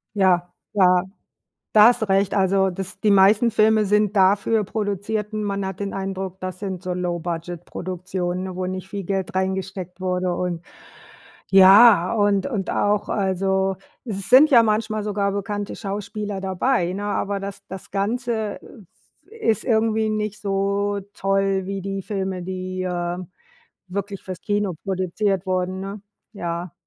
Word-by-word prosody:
Ja, 180 -3 +2 0.2
ja. 180 -2 +4 0.7
Da 215 0 +8
hast 240 0 +3
du 220 - 0
recht. 195 0 +2
Also, 190 0 +2
das 190 +1 -6
die 210 - +3
meisten 205 +4 +5
Filme 215 0 +4
sind 210 +1 +2
dafür 200 +3 +3
produzierten. 210 +1 -3
Man 200 -1 -2
hat 190 -1 -5
den 200 - -3
Eindruck, 190 -1 -4
das 185 0 -6
sind 190 -3 -5
so 180 -1 -2
Low 180 -1 -2
Budget 170 0 -5
Produktionen, 185 0 -4
wo 185 - -3
nicht 185 0 -5
viel 200 0 -5
Geld 190 0 -3
reingesteckt 190 -1 -3
wurde 185 -1 -1
und 175 -1 -3 0.9
ja 195 0 +8
und 205 0 +2
und 210 -8 -3
auch 205 0 +1
also, 190 -1 0 0.3
es 200 -4 -5
sind 275 +5 +8
ja 235 -3 +7
manchmal 215 0 0
sogar 200 -1 -1
bekannte 205 +1 -4
Schauspieler 205 0 -4
dabei, 190 0 0
ne? 200 +2 -4
Aber 205 -1 -1
das 200 0 -6
das 190 0 -9
Ganze, 220 +1 -2 0.7
äh, 455 - -6
ist 220 - +1
irgendwie 220 -2 +2
nicht 215 -1 -2
so 200 0 0
toll 195 -1 0
wie 195 0 -4
die 195 0 -4
Filme, 190 -2 -3
die, 185 0 -4
äh, 175 -1 -2 0.7
wirklich 195 +1 -5
fürs 185 -2 -7
Kino 205 -3 -1
produziert 190 0 -1
wurden, 185 0 -1
ne? 195 +1 -6 0.3
Ja. 170 -2 -4
195 Hz, 150 wpm, -22 LUFS, 185-205 Hz, 0.9 s, Da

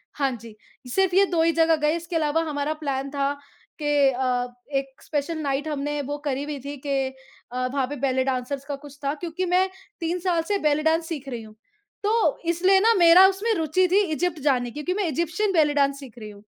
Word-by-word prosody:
हाँ 275 -2 +1
जी। 230 -2 -12 0.4
सिर्फ़ 380 -2 +2
ये 395 +1 +6
2 345 -4 0
ही 330 - +4
जगह 325 0 +3
गए। 300 +1 +1
इसके 340 0 -5
अलावा 315 0 +1
हमारा 290 +1 -1
प्लान 275 -1 -2
था 280 0 0 0.5
कि 290 -2 +3
अ, 250 -1 0 0.3
एक 270 -1 -5
स्पेशल 305 +2 -2
नाइट 285 0 -1
हमने 295 -1 -2
बुक 290 +2 -5
करी 280 -2 -1
हुई 290 -1 -5
थी 285 +1 -5
कि 275 -2 0 0.4
अ, 255 +1 -1
वहाँ 270 -2 0
पे 290 - -5
बेली 260 -1 +1
डांसर्स 265 +1 -3
का 285 0 -4
कुछ 285 0 -13
था, 280 - +1
क्योंकि 340 +3 -4
मैं 365 +2 +2 0.3
3 340 +1 -2
साल 345 -2 +1
से 410 - +1
बेली 300 +1 +1
डांस 325 +1 +2
सीख 285 -5 -5
रही 235 -3 -5
हूँ। 215 0 -14 0.5
तो 440 +2 +2
इसलिए 365 +3 +4
ना, 450 +4 +4
मेरा 350 0 +8
उसमें 395 +4 0
रुचि 330 +2 +2
थी 400 +2 +5
इजिप्ट 345 0 -1
जाने 245 -3 0
की, 300 +5 -6
क्योंकि 360 - -1
मैं 380 - 0
इजिप्शियन 340 +7 0
बेली 305 -4 +3
डांस 280 -1 +1
सीख 260 -4 -12
रही 215 -1 -8
हूँ। 205 0 -14
295 Hz, 215 wpm, -24 LUFS, 275-340 Hz, 0.5 s, मेरा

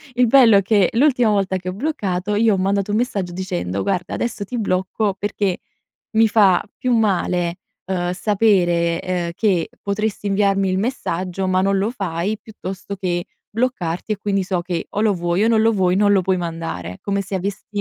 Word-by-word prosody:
il 250 0 +4
bello 225 -5 +7
che 200 -1 +3
l'ultima 245 -2 +3
volta 195 -2 +1
che 185 0 -4
ho - - -4
bloccato, 205 - -2
io 220 +1 +3
ho - - -2
mandato 195 +2 0
un 210 - +1
messaggio 200 -7 -1
dicendo: 100 - -3
"Guarda 180 - -2
adesso 235 -3 -3
ti 240 +4 -4
blocco 195 +1 0
perché 200 -2 -1 0.5
mi 225 0 +4
fa 200 -4 +4 0.2
più 255 - 0
male, 180 -6 +1 0.3
uhm, 180 -2 -1
sapere, 180 -5 +2
ehm, 180 -2 -2
che 185 -5 +1
potresti 205 0 -2
inviarmi 195 -1 +2
il 185 - 0
messaggio 190 -5 -2
ma 185 0 +2
non 195 +1 +2
lo 200 +3 0
fai 195 -2 -3
piuttosto 200 -2 -7
che, 175 -3 -2 0.3
bloccarti 215 -6 -2
e - - -1
quindi 195 -2 -1
so 185 -1 -1
che 175 -1 -3
o 205 - -2
lo 215 -1 +3
vuoi 175 +1 0
o 225 - +3
non 225 -1 +3
lo 225 +1 +4
vuoi 185 -3 +2
non 205 0 +4
lo 195 -2 +3
puoi 190 +1 +1
mandare". 165 - -5
Come 200 0 -1
se 195 0 -5
avessi 190 +1 -3
195 Hz, 190 wpm, -20 LUFS, 180-210 Hz, 0.5 s, bello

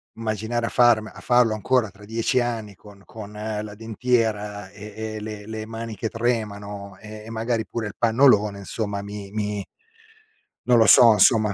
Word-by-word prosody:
immaginare 115 +1 -2
a - - -3
farme 120 -3 +3
a - - -13
farlo 120 -3 +3
ancora 110 +1 +1
tra 100 +2 -16
10 115 +4 0
anni 115 -4 -3
con 100 +1 -16
con 105 -2 -10
la 105 0 -5
dentiera 110 -2 -1
e 105 +1 -11 0.2
e - - -5
le 105 -1 -7
le 110 -1 -5
mani 115 0 -6
che 110 - -3
tremano, 105 -4 -3
e 110 0 -10
magari 115 0 -1
pure 110 +2 -4
il 105 - -9
pannolone 110 -4 +3
insomma 100 0 -4
mi 100 -1 -8
mi 105 -1 -3 1.0
non 125 -1 +5
lo 110 - +6
so, 115 +2 +8
insomma 105 0 +4
110 Hz, 165 wpm, -23 LUFS, 105-115 Hz, 1.0 s, so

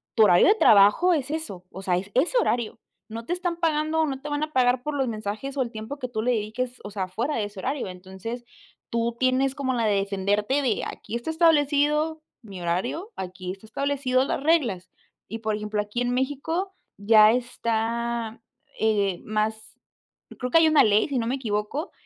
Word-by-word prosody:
tu 220 - +6
horario 175 -4 +6
de 415 - +6
trabajo 220 - +5
es 285 -3 -1
eso, 250 - -5
o 190 - -8
sea, 180 -2 +1
es 195 +3 -5
ese 340 - +2
horario, 235 - 0 0.3
no 230 +1 -7
te 350 - -1
están 355 -1 -2
pagando 315 -1 0
o - - +3
no 270 -2 -4
te 295 - -6
van 290 +1 -1
a 310 0 -5
pagar 250 -1 +3
por 300 +2 -4
los 265 -2 0
mensajes 215 +5 -5
o - - +2
el 240 -2 -2
tiempo 220 +6 -7
que 250 - -3
tú 220 -3 -3
le 250 +2 +1
dediques, 240 +3 -3
o 205 - -6
sea, 190 -2 -3
fuera 235 +10 -2
de 220 - 0
ese 205 -2 -9
horario. 265 +2 -2
Entonces, 190 +6 -8 0.4
tú 235 0 -1
tienes 260 +1 +2
como 265 -3 -1
la 230 -2 0
de 205 -1 +2
defenderte 200 +6 0
de: 245 -6 0
"Aquí 235 - -7
está 240 +7 -4
establecido 305 -1 +2 0.2
mi 195 -5 -10
horario, 185 - -2
aquí 185 0 -5
está 195 +3 -11
establecido 265 0 0
las 275 - -2
reglas", 260 - +1 0.4
y 225 +3 -6
por 220 -1 -1
ejemplo, 210 0 -2
aquí 210 +4 -4
en 245 - 0
México 290 +9 -2 0.2
ya 215 +1 +6
está, 235 -1 -2 0.4
eh, 200 -4 +1
más 215 +1 -2 0.6
creo 250 -1 -3
que - - +6
hay 320 - +5
una 310 -1 +6
ley, 210 +3 +3
si 265 - 0
no 230 - -2
me 260 - 0
equivoco, 230 - -3
235 Hz, 200 wpm, -25 LUFS, 210-285 Hz, 0.6 s, tu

